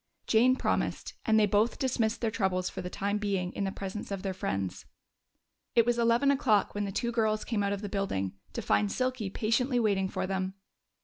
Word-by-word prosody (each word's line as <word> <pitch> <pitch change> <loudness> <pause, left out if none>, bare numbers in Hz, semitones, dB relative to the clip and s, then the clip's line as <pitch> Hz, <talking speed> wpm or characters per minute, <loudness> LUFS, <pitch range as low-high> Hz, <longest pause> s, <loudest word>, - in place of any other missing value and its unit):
Jane 245 +3 +4
promised, - - -1
and 220 -1 +5
they 210 - +5
both 210 +3 +2
dismissed 235 -4 0
their 225 -2 0
troubles 185 -4 0
for - - -5
the 180 - -5
time 205 +2 -1
being 195 -3 -1
in 200 - -2
the 195 - -1
presence 195 +2 -6
of 195 -2 -4
their 190 -1 -2
friends. 95 - -3 0.9
It 230 - +6
was 240 0 +1
eleven 235 +4 +4
o'clock 245 -8 +2
when 205 0 -1
the 195 - -3
two 235 +4 -1
girls 220 -2 +1
came 225 -4 -1
out 200 0 0
of 200 +1 -3
the - - -2
building, 190 - -2 0.2
to - - -4
find 205 -1 +2
Silky 255 -5 -1
patiently 240 +5 +1
waiting 200 -4 +1
for - - -2
them. 190 0 -2
210 Hz, 205 wpm, -30 LUFS, 195-230 Hz, 0.9 s, It